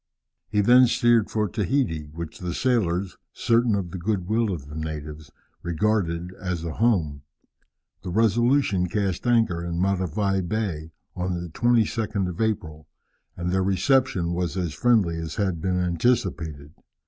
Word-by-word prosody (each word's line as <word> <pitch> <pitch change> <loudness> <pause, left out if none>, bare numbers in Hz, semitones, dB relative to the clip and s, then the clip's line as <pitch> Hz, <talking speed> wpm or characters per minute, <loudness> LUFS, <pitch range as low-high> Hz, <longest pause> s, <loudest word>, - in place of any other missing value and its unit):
He 105 - +2
then 125 +4 +6
steered 120 -2 +3
for 105 -1 0
Tahiti, 100 - -1
which 80 +2 -8
the 90 -1 -4
sailors, 100 -7 0 0.2
certain 115 -1 +2
of 90 -4 -3
the 95 - -6
good 95 -1 -2
will 110 0 +1
of 75 -7 -5
the 75 - -9
natives, 75 -1 -6 0.3
regarded 85 -1 -1
as 90 -3 -3
a 80 - -3
home. 85 -12 +1 0.8
The - - -6
Resolution 115 -1 +2
cast 100 +2 -1
anchor 115 -8 +2
in 85 0 -3
Matavai 95 +1 0
Bay 90 -5 -3 0.3
on 90 -1 -2
the 85 0 -6
22nd 110 -1 +1
of 90 - -5
April, 85 -9 -2 0.5
and 90 0 -2
their 95 +1 +2
reception 95 -1 +1
was 90 +1 -2
as 85 -4 -2
friendly 95 - +2
as 80 -1 -5
had 95 -6 -1
been 90 -1 0
anticipated. 85 - -1
95 Hz, 150 wpm, -24 LUFS, 85-110 Hz, 0.8 s, then